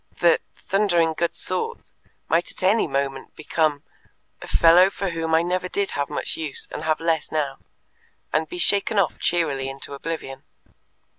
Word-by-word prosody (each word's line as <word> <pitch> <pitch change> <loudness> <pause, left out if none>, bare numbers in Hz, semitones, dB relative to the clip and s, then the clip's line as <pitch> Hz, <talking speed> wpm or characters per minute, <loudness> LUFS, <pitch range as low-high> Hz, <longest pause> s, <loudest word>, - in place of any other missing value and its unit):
The 170 -1 +5 0.2
"thundering 175 -5 +2
good 170 +2 -1
sort" 460 +1 -3 0.4
might 170 +2 +1
at - - -10
any 205 +2 +3
moment 135 -1 -3
become 155 -2 0 0.6
"a - - -8
fellow 175 +3 +6
for 195 -1 -3
whom 165 -1 0
I 165 - +4
never 180 +1 -1
did 200 +1 -1
have 140 0 -2
much - - -3
use, 155 -4 -6
and - - -5
have 155 -1 +1
less 165 -2 0
now," 145 -3 -2 0.7
and 155 0 +1
be - - -6
shaken 200 +4 +2
off 195 -5 +1
cheerily 145 -6 0
into 135 +1 -6
oblivion. 140 -2 -5
165 Hz, 160 wpm, -23 LUFS, 150-180 Hz, 0.7 s, fellow